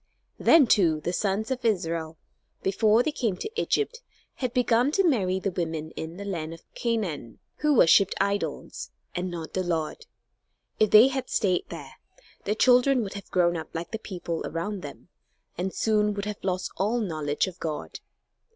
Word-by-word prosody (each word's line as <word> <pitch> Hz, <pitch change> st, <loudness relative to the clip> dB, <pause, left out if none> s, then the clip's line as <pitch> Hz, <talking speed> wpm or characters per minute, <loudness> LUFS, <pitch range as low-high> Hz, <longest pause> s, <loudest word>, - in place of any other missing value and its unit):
Then, 325 Hz, -4 st, +6 dB
too, 170 Hz, -9 st, +3 dB
the 175 Hz, +4 st, -3 dB
sons 205 Hz, +5 st, -1 dB
of 255 Hz, -1 st, -2 dB
Israel, 165 Hz, -7 st, -1 dB, 0.5 s
before 215 Hz, +4 st, +3 dB
they 310 Hz, -, 0 dB
came 225 Hz, -10 st, -1 dB
to 430 Hz, -, -5 dB
Egypt, 465 Hz, +3 st, 0 dB, 0.4 s
had 255 Hz, -3 st, -2 dB
begun 250 Hz, +1 st, +2 dB
to 390 Hz, 0 st, +3 dB
marry 190 Hz, -, +1 dB
the 195 Hz, 0 st, -2 dB
women 160 Hz, -3 st, -3 dB
in 160 Hz, +2 st, -7 dB
the 200 Hz, -, -6 dB
land 165 Hz, -4 st, -4 dB
of 165 Hz, -, -18 dB
Canaan 190 Hz, -, -2 dB, 0.2 s
who 300 Hz, -1 st, +2 dB
worshipped 195 Hz, -1 st, +5 dB
idols, 200 Hz, +1 st, -2 dB, 0.2 s
and 180 Hz, +1 st, -2 dB
not 170 Hz, -2 st, -6 dB
the 185 Hz, -, 0 dB
Lord. 165 Hz, -4 st, -3 dB, 0.7 s
If 215 Hz, -, +4 dB
they 220 Hz, +6 st, +8 dB
had 265 Hz, -1 st, -4 dB
stayed 185 Hz, -4 st, +1 dB
there, -, -, -9 dB, 0.5 s
their 210 Hz, -, 0 dB
children 250 Hz, +1 st, +4 dB
would 195 Hz, -, -6 dB
have 200 Hz, -2 st, -9 dB
grown 175 Hz, -1 st, +2 dB
up 160 Hz, -1 st, -7 dB
like 165 Hz, +1 st, -4 dB
the 220 Hz, -, -3 dB
people 175 Hz, -5 st, -5 dB
around 185 Hz, +5 st, -4 dB
them 145 Hz, +3 st, -10 dB, 0.5 s
and 185 Hz, +2 st, -2 dB
soon 210 Hz, -1 st, +1 dB
would 200 Hz, 0 st, -3 dB
have 210 Hz, -1 st, -6 dB
lost 185 Hz, -1 st, -2 dB
all 210 Hz, +5 st, +1 dB
knowledge 155 Hz, -8 st, -1 dB
of 185 Hz, -2 st, -8 dB
God. 155 Hz, -2 st, -5 dB
195 Hz, 175 wpm, -26 LUFS, 170-225 Hz, 0.7 s, they